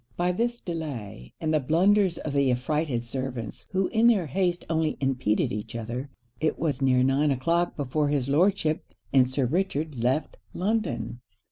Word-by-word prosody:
By 180 +1 +2
this 235 +6 0
delay, 125 - -6
and 155 -1 -1
the 155 - +4
blunders 180 +6 +3
of 150 - -4
the 140 -2 +3
affrighted 125 0 0
servants, 125 -2 -5
who 190 0 +1
in 230 +1 +4
their 210 -7 +4
haste 175 +3 -1
only 160 -1 0
impeded 130 -6 +1
each 105 +2 -5
other, 120 +4 -4 0.3
it 155 - 0
was 145 -5 -1
near 130 -1 +4
nine 135 +3 +3
o'clock 170 +6 +1
before 145 +1 0
his 140 -3 0
Lordship 160 +1 +2 0.3
and 130 -2 +5
Sir 130 0 0
Richard 155 -2 -1
left 130 +5 0 0.2
London. 185 - -1
150 Hz, 160 wpm, -26 LUFS, 130-175 Hz, 0.3 s, and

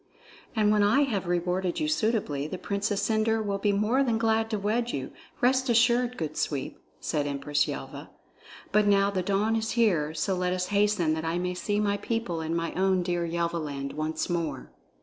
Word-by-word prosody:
"And 210 -2 +3
when 210 -1 +3
I 210 +7 +4
have 210 -10 -1
rewarded 180 +1 0
you 310 - 0
suitably, 215 - 0
the 185 - -5
Princess 200 +1 -1
Cendre 220 0 +1
will 200 -1 -2
be 205 +1 +2
more 210 +6 +2
than 235 -4 +1
glad 225 0 +1
to 215 - -1
wed 225 +4 0
you, 135 -1 -4 0.3
rest 260 +1 +3
assured, 240 +1 +3
good 155 -2 -4
Sweep," 140 -3 -3 0.2
said 150 -3 -1
Empress 145 +1 0
Yelva. - - -6 0.6
"But 210 0 +3
now 200 0 +4
the 190 -2 -1
dawn 200 +4 +1
is 220 0 -1
here, 170 -10 +2
so 190 +4 0
let 180 0 0
us 180 0 -2
hasten 200 -6 +2
that 160 0 -3
I 165 +1 -1
may 180 0 -1
see 205 +3 -1
my 205 -1 +1
people 205 -6 -2
and 160 +1 -2
my 165 0 -2
own 190 -1 +2
dear 175 -1 -1
Yelvaland 165 -5 -2
once 155 +1 -2
more." 165 -7 -3
195 Hz, 190 wpm, -27 LUFS, 170-220 Hz, 0.6 s, I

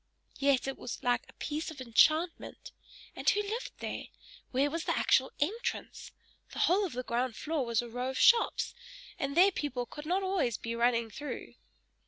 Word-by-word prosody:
Yet 275 -2 +3
it 270 - -4
was 245 - -6
like 245 0 +1
a - - -15
piece 305 +2 -4
of 315 -4 -9
enchantment. 310 +8 +2 0.4
And - - +2
who 415 +1 +2
lived 440 +4 -4
there? - - -4 0.4
Where 275 +3 +1
was 330 +1 -3
the - - 0
actual 265 0 +3
entrance? 410 +11 -3 0.4
The - - -8
whole 390 +4 +3
of 325 - -10
the 250 +1 -3
ground 240 0 -1
floor 310 -3 -2
was 235 0 +1
a - - -7
row 245 +2 -3
of 265 - -4
shops, 475 0 +4 0.5
and 280 +2 -2
there 380 +3 +7
people 270 -8 -3
could 295 +5 -9
not 375 +3 +1
always 375 - 0
be 230 0 -4
running 235 -1 +2
through. 290 +7 -6
280 Hz, 185 wpm, -31 LUFS, 245-335 Hz, 0.5 s, there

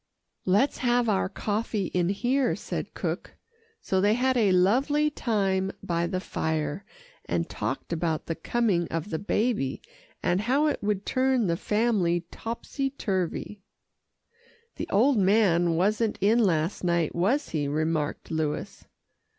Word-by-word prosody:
"Let's 205 +10 +2
have 245 -1 +2
our 195 -3 +1
coffee 210 -1 -2
in 175 -1 +1
here," 245 +6 +1
said - - -5
cook, - - -4 0.5
so 190 -1 0
they 205 +2 +4
had 260 +1 +1
a 215 -5 +3
lovely 270 +12 +3
time 195 -7 0
by 170 0 0
the 185 +1 -2
fire, 160 -1 -2 0.4
and - - -1
talked - - -4
about 160 -2 -1
the 165 - -2
coming 195 -3 0
of 165 +5 -4
the 160 - -1
baby, 205 - 0 0.4
and 180 +2 +2
how 265 +7 +2
it 300 - 0
would 205 -1 -1
turn 260 -3 +2
the 170 -2 +1
family 205 -4 +1
topsy 255 +4 -4
turvy. 195 - -3 1.2
"The - - -4
old 240 +4 +4
man 185 -4 +3
wasn't 210 +5 +1
in 215 +5 +3
last 170 -5 +1
night, 170 -3 +1
was 225 - +1
he?" 150 -3 -1
remarked 155 +1 -1
Louis. 155 -2 -3
195 Hz, 140 wpm, -27 LUFS, 170-235 Hz, 1.2 s, they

